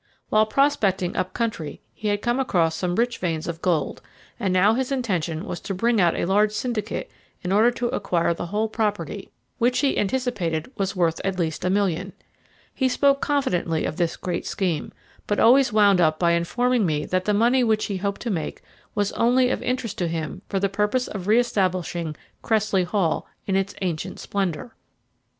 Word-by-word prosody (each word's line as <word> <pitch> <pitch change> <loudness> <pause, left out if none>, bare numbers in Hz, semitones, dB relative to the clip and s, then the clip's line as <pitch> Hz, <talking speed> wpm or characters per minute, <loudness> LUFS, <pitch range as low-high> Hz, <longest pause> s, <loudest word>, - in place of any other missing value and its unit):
While 215 0 +4
prospecting 205 -8 +1
up 185 0 -1
country 220 -10 -3
he 215 - -5
had 205 0 0
come 240 +2 +1
across 170 -11 +1
some 175 +1 -1
rich 235 +2 0
veins 165 -3 -2
of 165 -1 -5
gold, 165 -6 0 0.4
and 190 - 0
now 190 +4 +4
his 260 +2 -1
intention 180 - -1
was 175 - -5
to 195 - -5
bring 230 +2 +2
out 170 -2 +3
a - - 0
large 205 +3 +3
syndicate 215 -2 -3 0.3
in 180 - -2
order 215 +4 +5
to 245 0 -2
acquire 170 -5 0
the 170 - -5
whole 210 +5 0
property, 215 -2 -2 0.3
which, 245 +1 +2
he 280 -2 +2
anticipated, 205 -7 -1
was 195 0 -2
worth 165 -3 +1
at 190 -1 -1
least 160 -3 -2
a 180 - +1
million. 190 -4 0 0.6
He 260 -1 +1
spoke 275 +2 +3
confidently 180 - 0
of - - -3
this 170 -2 0
great 175 -2 -3
scheme, 175 -6 -2 0.4
but 205 - 0
always 255 +2 +6
wound 205 -3 +5
up 155 -1 +3
by 170 0 +3
informing 235 +8 +1
me 150 -4 0
that 185 0 -1
the 210 - +2
money 240 +4 +4
which 220 -2 +2
he 200 - -3
hoped 200 +1 -3
to 235 - -2
make 165 -5 -4 0.3
was 205 -1 +1
only 250 +2 +3
of - - -2
interest 250 -4 -2
to 175 - +1
him 165 +2 -4
for 195 - 0
the 200 - +2
purpose 210 +6 0
of 195 -3 -6
re 215 +2 +5
establishing 185 -8 0 0.3
Cressley 215 -4 +1
Hall 180 -3 0 0.2
in 190 - 0
its 195 0 0
ancient 180 +1 -3
splendour. 195 +2 -3
200 Hz, 190 wpm, -24 LUFS, 175-230 Hz, 0.6 s, always